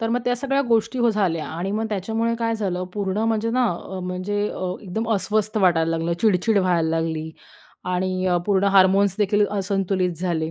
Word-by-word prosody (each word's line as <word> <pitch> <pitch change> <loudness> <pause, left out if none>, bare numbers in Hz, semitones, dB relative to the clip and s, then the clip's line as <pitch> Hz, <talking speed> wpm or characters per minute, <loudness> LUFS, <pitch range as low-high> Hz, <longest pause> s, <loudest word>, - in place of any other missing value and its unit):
तर 225 - -1
मग 245 +1 +1
त्या 245 0 +1
सगळ्या 275 +2 0
गोष्टी 230 +2 +1
व 240 - +3
झाल्या. 180 -7 0
आणि 175 +4 -4
मग 220 +2 -1
त्याच्यामुळे 225 +3 -1
काय 230 -1 0
झालं, 185 -4 -2
पूर्ण 200 -1 -2
म्हणजे 225 0 0
ना 250 +1 +2
अ, 185 +2 -7
म्हणजे 185 +3 -3
अ, 185 -1 -4
एकदम 215 +4 -4
अस्वस्थ 215 +2 0
वाटायला 165 -4 +3
लागलं, 165 +1 -1
चिड-चिड 215 0 +3
व्हायला 175 -4 +1
लागली. 160 -1 -2 0.5
आणि 185 +1 -1
अ, 180 -1 +2
पूर्ण 200 -1 +2
हार्मोन्सदेखील 200 +2 +4
असंतुलित 195 -2 0
झाले. 160 -3 -1
195 Hz, 175 wpm, -22 LUFS, 180-220 Hz, 0.5 s, हार्मोन्सदेखील